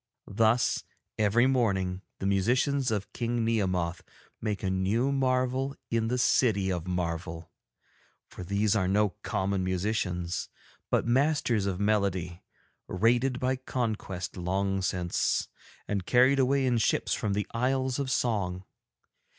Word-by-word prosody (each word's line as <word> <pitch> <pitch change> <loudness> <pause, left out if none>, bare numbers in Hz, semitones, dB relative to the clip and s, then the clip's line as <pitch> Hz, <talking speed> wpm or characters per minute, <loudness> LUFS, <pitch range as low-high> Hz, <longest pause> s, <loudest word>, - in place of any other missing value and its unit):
Thus, 115 +3 +2 0.4
every 110 +3 +4
morning, 95 -8 +1 0.2
the - - -5
musicians 125 +7 +2
of 105 -2 -3
King 120 -1 -1
Nehemoth 90 -6 0 0.4
make 105 -2 -2
a 95 - 0
new 100 +8 +1
marvel 130 0 0 0.2
in 115 -1 +1
the 125 +2 0
City 110 -6 +2
of 90 -1 -3
Marvel; 85 -2 -3 0.8
for - - -9
these 100 +3 +1
are 95 -4 +1
no 105 +2 +3
common 95 0 -1
musicians, 90 -2 -2 0.4
but - - +1
masters 120 -4 +2
of 95 -2 -2
melody, 100 -4 0 0.5
raided 120 +6 +2
by 130 +1 +1
conquest 110 -8 -3
long 95 +2 -1
since, 90 -2 0 0.4
and 100 -2 -1
carried 130 +3 +5
away 135 +1 +2
in 120 -2 +2
ships - - +1
from 100 - -1
the 105 0 -1
Isles 130 +2 0
of 140 -2 -2
Song. 95 -8 -1
105 Hz, 130 wpm, -28 LUFS, 95-125 Hz, 0.8 s, carried